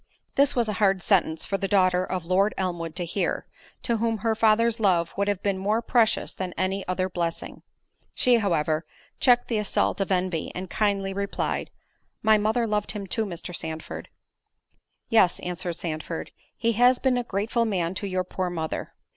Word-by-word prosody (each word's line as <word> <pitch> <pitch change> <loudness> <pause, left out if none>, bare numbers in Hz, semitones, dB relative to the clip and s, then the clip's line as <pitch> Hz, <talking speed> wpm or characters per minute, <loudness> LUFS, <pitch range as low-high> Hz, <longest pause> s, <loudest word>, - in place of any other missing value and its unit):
This 280 0 +3
was 240 -3 +2
a 215 - -1
hard 195 -3 +3
sentence 170 -5 +2
for 195 - -2
the 195 - -1
daughter 185 -2 +3
of 185 -2 -3
Lord 190 +4 +2
Elmwood 175 -4 -3
to 180 - -3
hear, 180 +2 -1 0.4
to 235 -2 +1
whom 225 0 0
her 225 +2 0
father's 225 +1 +3
love 175 -5 +2
would 200 +1 0
have 200 -2 -1
been 195 -2 0
more 210 +4 +1
precious 235 -1 +2
than 185 -2 -5
any 190 +1 0
other 185 0 0
blessing.—She, 175 +7 -2
however, 160 -6 +1 0.4
checked 245 -2 +4
the 225 -3 0
assault 205 -1 0
of 195 - -1
envy, 180 -3 0
and 185 0 -6
kindly 200 -2 0
replied, 200 0 -2 0.5
"My 215 0 +5
mother 220 +3 +1
loved 210 -2 -1
him 205 -2 -5
too, 220 +4 -1
Mr. 175 -1 -6
Sandford." 160 0 -5 1.0
"Yes," 220 -6 +4
answered 180 -1 -4
Sandford, 160 0 -5 0.3
"he 230 - +1
has 245 +3 +5
been 260 -1 +2
a - - -2
grateful 225 +2 0
man 180 -5 -1
to 200 +2 -4
your 185 -1 -1
poor 185 0 -3
mother. 160 -2 -4
195 Hz, 175 wpm, -26 LUFS, 180-220 Hz, 1.0 s, My